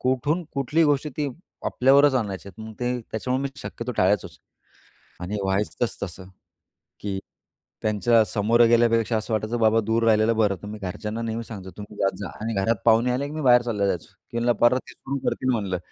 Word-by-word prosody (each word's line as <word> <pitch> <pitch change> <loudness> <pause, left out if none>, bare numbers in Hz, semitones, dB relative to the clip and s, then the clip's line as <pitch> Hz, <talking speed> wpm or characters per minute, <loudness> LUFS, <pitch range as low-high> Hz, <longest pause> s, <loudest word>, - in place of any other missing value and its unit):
कुठून 145 +7 0
कुठलीही 150 +4 +2
गोष्टी 145 +1 +1
ती 145 -2 0 0.4
आपल्यावरच 140 +2 +4
आणायचे 100 -5 -2
आहेत. 95 +3 -13
मग 110 - -8
ते 125 0 -1
त्याच्यामुळे 125 +4 -1
मी 140 - -1
शक्यतो 120 +1 -5
टाळायचोच 95 +1 +1 0.8
आणि 100 +4 -3
व्हायचंच 100 +4 -1
तसं, 95 0 -7 0.7
की 100 -2 -3 0.6
त्यांच्या 110 +2 +3
समोरं 115 +4 +3
गेल्यापेक्षा 115 -1 +3
असं 110 +1 -3
वाटायचं, 110 +2 -1
बाबा, 110 0 +4
दूर 115 +2 0
राहिलेलं 110 0 +4
बरं. 105 -3 +3
तुम्ही 105 +1 -7
घरच्यांना 105 +4 -4
नेहमी 115 0 -3
सांगतो, 100 -5 -9
"तुम्ही 105 0 -10
जात 95 - +1
जा." 100 - -5
आणि 115 +1 -2
घरात 115 +4 +2
पाहुणे 115 +2 +4
आले, 135 +3 -1
की 145 - -8
मी 155 - -3
बाहेर 125 -3 +6
चालला 105 -5 -1
जायचो. 90 -3 -2 0.2
की 120 - -4
म्हंटलं, 120 +1 +2
"परत 130 +1 +2
ते - - -11
सुरू 140 +1 -5
करतील," 130 - -1
म्हणलं, 100 -6 -1
115 Hz, 185 wpm, -24 LUFS, 105-125 Hz, 0.8 s, बाहेर